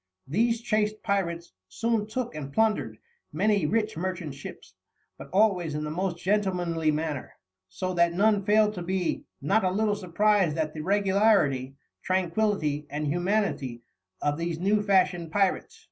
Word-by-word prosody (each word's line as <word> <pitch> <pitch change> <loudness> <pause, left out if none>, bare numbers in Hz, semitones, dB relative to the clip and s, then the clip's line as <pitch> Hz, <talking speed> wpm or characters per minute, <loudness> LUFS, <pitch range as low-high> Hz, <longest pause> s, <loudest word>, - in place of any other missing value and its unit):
These 230 - +1
chaste 215 -2 0
pirates 170 - -2 0.2
soon 225 -2 -1
took 235 0 -3
and 145 -3 -6
plundered 220 +6 +1 0.3
many 205 +4 +1
rich 220 0 0
merchant 175 -3 -4
ships, 135 - -10 0.4
but - - -11
always 185 -5 +2
in 150 - -2
the 150 - -4
most 180 +1 -2
gentlemanly 180 -5 0
manner, 150 -2 -2 0.4
so 185 - -3
that 170 -1 +3
none 205 +3 +2
failed 210 +1 +3
to 180 - -6
be 180 0 -2 0.2
"not 200 +9 +2
a 185 - +2
little 210 +3 +1
surprised 195 -3 +1
at 155 -1 -1
the 155 - -5
Regularity, 190 - +2 0.3
Tranquillity 185 -5 0
and 150 +1 -3
Humanity 175 - -1 0.4
of 145 +1 0
these 170 -1 -2
new 200 +4 +2
fashioned 185 -4 +2
Pyrates." 195 0 0
185 Hz, 145 wpm, -27 LUFS, 160-210 Hz, 0.4 s, that